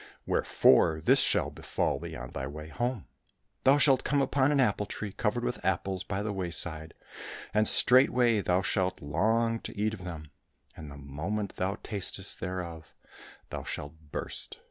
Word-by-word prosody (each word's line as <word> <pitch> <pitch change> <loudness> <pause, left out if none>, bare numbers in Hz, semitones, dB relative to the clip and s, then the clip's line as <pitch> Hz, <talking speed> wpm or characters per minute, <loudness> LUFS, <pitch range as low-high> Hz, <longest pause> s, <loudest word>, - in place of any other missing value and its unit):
Wherefore 80 -1 +3
this 80 - +4
shall - - +2
befall - - -2
thee - - -7
on 65 -1 -8
thy 65 - -4
way 75 +2 -8
home: 120 +1 -3 0.6
thou 135 +2 +6
shalt 135 -3 +4
come 145 +1 +1
upon 135 0 +2
an 145 - +2
apple 105 -5 +1
tree 105 -2 -5
covered - - -1
with - - -3
apples 95 -1 -1
by 100 0 -3
the 105 -1 -3
wayside, 85 -4 -1 0.6
and 105 0 +3
straightway 125 -3 +5
thou 90 0 +1
shalt 95 -2 0
long 115 +10 +1
to - - -9
eat 105 +1 0
of 95 -4 -8
them, 80 -4 -8 0.4
and 75 -2 -9
the 70 - -10
moment 85 +9 -4
thou 95 +3 -1
tastest 100 -1 -4
thereof 90 -3 -6 0.6
thou - - -5
shalt 70 0 -6 0.2
burst. - - -3
95 Hz, 165 wpm, -29 LUFS, 80-110 Hz, 0.6 s, thou